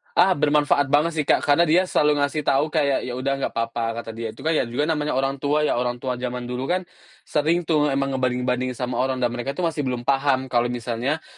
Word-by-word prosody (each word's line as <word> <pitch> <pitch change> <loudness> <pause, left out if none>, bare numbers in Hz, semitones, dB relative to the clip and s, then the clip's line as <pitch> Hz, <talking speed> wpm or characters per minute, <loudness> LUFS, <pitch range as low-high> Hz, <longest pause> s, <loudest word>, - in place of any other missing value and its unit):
Ah, 185 +1 +5
bermanfaat 145 -1 +2
banget 150 +3 +3
sih, 155 - +1
Kak. - - +3
Karena 145 +4 +3
dia 175 +3 +3
selalu 150 -4 +2
ngasih 145 +2 0
tahu 140 +2 +2
kayak, 145 -3 +1
“Ya 125 - -4
udah 130 +2 -1
nggak - - -3
papa,” 115 0 -2
kata 115 -1 -6
dia. 115 -1 -6
Itu 135 - -12
kan 160 - +1
ya 155 -6 +1
juga 120 +5 -1
namanya 150 -2 -1
orang 135 +1 -1
tua 150 +2 +1
ya. 135 - +1
Orang 120 0 -3
tua 125 -2 -2
jaman 125 0 -4
dulu 125 +2 -3
kan 185 +1 0 0.4
sering 160 +4 +1
tuh 155 -2 +2
emang 135 -1 0
ngebanding-bandingin 125 -1 -1
sama 125 0 -3
orang. 130 0 0
Dan 120 - +2
mereka 120 +3 -4
itu 180 - -3
masih 155 -5 -1
belum 125 -1 -3
paham 135 -1 +1
kalau 120 0 +2
misalnya 120 +5 -3
135 Hz, 230 wpm, -23 LUFS, 125-150 Hz, 0.4 s, Ah